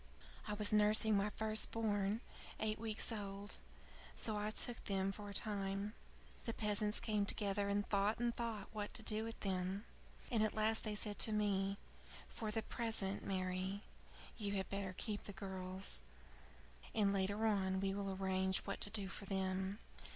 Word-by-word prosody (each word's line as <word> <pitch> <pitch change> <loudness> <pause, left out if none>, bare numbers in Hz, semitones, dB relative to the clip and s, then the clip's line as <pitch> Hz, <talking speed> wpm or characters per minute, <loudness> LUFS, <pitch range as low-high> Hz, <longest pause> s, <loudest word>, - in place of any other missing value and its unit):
I 210 - -1
was 210 0 +3
nursing 215 +1 +6
my 200 +1 +3
first 220 0 +1
born 210 -1 +1 0.4
eight 215 0 0
weeks 220 +1 0
old. 200 -1 -5 0.6
So 220 - -2
I 210 0 0
took 235 +2 +1
them 195 -1 +1
for 205 +1 -6
a - - -6
time. 200 -1 0 0.5
The 230 - -2
peasants 210 0 +3
came 215 -3 +1
together, 200 -1 0
and 205 0 +1
thought 205 +2 +2
and 240 0 +1
thought 225 -4 -3
what 210 -1 -4
to 220 - -1
do 215 0 0
with 225 0 -5
them; 190 +2 -1 0.5
and 230 -3 +3
at 215 - +2
last 220 +1 +4
they 215 -1 -1
said 205 0 -2
to 220 - +5
me: 200 -2 +1 0.5
'For 220 - -4
the 220 +1 0
present, 220 -5 0
Mary, 185 +1 -1 0.6
you 205 -2 0
had 190 -2 -1
better 195 -2 -2
keep 210 -3 -3
the 200 - -6
girls, 190 - -4 0.9
and 205 -2 +4
later 200 +3 +1
on 190 -3 +2
we 195 0 +1
will 200 0 -2
arrange 190 0 +1
what 200 - -4
to - - +5
do 205 -2 +1
for 195 +1 -6
them.' 190 0 -1
205 Hz, 170 wpm, -39 LUFS, 195-215 Hz, 0.9 s, nursing